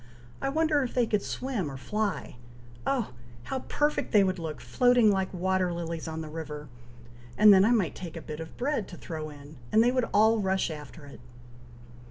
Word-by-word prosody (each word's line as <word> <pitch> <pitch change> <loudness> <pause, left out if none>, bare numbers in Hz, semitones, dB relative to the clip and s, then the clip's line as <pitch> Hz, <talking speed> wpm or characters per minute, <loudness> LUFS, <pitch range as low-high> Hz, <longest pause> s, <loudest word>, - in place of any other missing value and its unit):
"I 275 - 0
wonder 310 0 +2
if 255 - -3
they 245 -2 +3
could 210 -2 0
swim 240 - -3
or 135 - -7
fly! 210 +6 -3 0.5
oh! 260 - 0 0.3
how 265 - -3
perfect 295 +3 -1
they 205 -2 +6
would 185 -1 0
look, 160 -3 -5
floating 245 -4 +4
like 190 -1 0
water 185 0 0
lilies 170 -1 -4
on 160 0 -4
the 160 - -6
river, 150 -2 -7 0.7
and 210 -1 +8
then 190 0 +6
I 215 - +4
might 215 -9 +2
take 175 -3 -8
a - - -6
bit 155 -1 -7
of 160 0 -8
bread 250 -5 -1
to 175 - -10
throw 155 -2 -6
in, 145 0 -12
and 220 - +5
they 245 - +4
would 255 -2 0
all 220 +2 +4
rush 190 -3 0
after 150 0 -9
it!" 140 - -12
190 Hz, 200 wpm, -28 LUFS, 160-235 Hz, 0.7 s, and